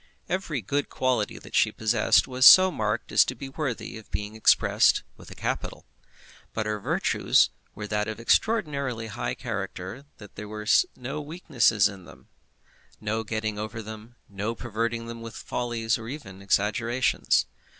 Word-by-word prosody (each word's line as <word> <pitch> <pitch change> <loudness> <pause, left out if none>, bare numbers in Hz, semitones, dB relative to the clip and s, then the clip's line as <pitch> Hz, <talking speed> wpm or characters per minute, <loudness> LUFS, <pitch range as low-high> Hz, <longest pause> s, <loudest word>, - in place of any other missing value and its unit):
Every 175 -7 -2
good 140 +8 -2
quality 125 -5 0
that - - -13
she - - +3
possessed 110 0 +2
was 130 0 -2
so 185 0 +9
marked 105 -4 -2
as - - +6
to 130 - -4
be 135 +3 -8
worthy 135 -5 -4
of 110 - -17
being 105 +3 -4
expressed 110 - +4
with - - -14
a - - -10
capital. - - -4 0.7
But 110 - -1
her 105 0 -2
virtues - - +2 0.2
were 105 - -7
of 105 - -7
that 105 0 0
extraordinarily 140 - +1
high 120 - -3
character 105 0 -5
that 105 -2 -13
there 105 +1 -6
was 105 +1 +2
no 135 +4 -5
weakness 150 -5 +1 0.2
in 95 -3 -10
them, - - -16 0.7
no 110 +1 -2
getting 110 -1 -3
over 110 +1 -5
them, 110 +2 -10
no 105 +3 -4
perverting 115 +1 -3
them 115 0 -8
with 115 -2 -8
follies 120 -2 -2
or 110 - -8
even 100 -10 -8
exaggerations. 115 +5 +1
115 Hz, 160 wpm, -26 LUFS, 105-130 Hz, 0.7 s, so